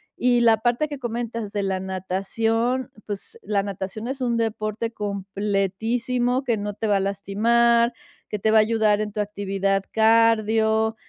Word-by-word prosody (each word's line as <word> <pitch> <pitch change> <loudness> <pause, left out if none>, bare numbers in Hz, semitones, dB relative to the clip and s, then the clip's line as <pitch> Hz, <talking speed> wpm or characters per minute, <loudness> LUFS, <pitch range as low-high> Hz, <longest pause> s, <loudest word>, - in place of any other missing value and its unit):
Y 245 -1 +2
la 225 -2 +5
parte 240 +6 0
que 290 -2 -7
comentas 230 -3 -4
de 205 -1 -1
la 190 -1 -1
natación, 225 +7 -1 0.2
pues, 205 - -6
la 200 - 0
natación 200 +3 -5
es 265 0 -4
un 235 -2 0
deporte 220 0 -2
completísimo 210 +5 -1
que 235 -4 +1
no 205 -1 -4
te 220 - -4
va 205 -2 +3
a - - 0
lastimar, 235 +5 +2 0.4
que 210 - -2
te 215 +2 +1
va 220 - +6
a - - +7
ayudar 215 -1 +2
en 210 -1 -3
tu 210 - -6
actividad 195 -1 -1
cardio. 220 0 +3
220 Hz, 160 wpm, -23 LUFS, 200-235 Hz, 0.4 s, a